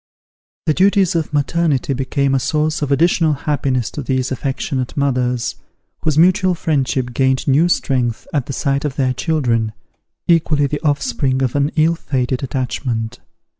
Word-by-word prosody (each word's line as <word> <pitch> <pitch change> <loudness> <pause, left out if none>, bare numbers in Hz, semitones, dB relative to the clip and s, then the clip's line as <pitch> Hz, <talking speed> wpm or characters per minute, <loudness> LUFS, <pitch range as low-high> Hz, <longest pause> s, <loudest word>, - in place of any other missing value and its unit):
The 155 - +3
duties 195 +1 +3
of 165 -3 -1
maternity 145 -1 +1
became 135 +1 0
a 135 - +3
source 155 +3 0
of 145 -1 -1
additional 165 +2 +3
happiness 135 -4 -1
to 150 - -5
these 130 -1 -1
affectionate 130 0 -3
mothers, 125 -3 0 0.4
whose 155 -2 -1
mutual 180 +2 +4
friendship 130 -6 -1
gained 130 +1 +1
new 150 +6 +4
strength 125 -8 0
at 140 -5 0
the 140 - -4
sight 140 +1 0
of 145 -3 -2
their 130 -2 +1
children, 120 -8 0 0.5
equally 155 -4 +3
the 145 +1 -3
offspring 135 -3 0
of 125 0 -1
an 145 0 +2
ill 160 +1 +3
fated 130 -5 -2
attachment. 125 -3 -3
140 Hz, 150 wpm, -18 LUFS, 130-155 Hz, 0.5 s, mutual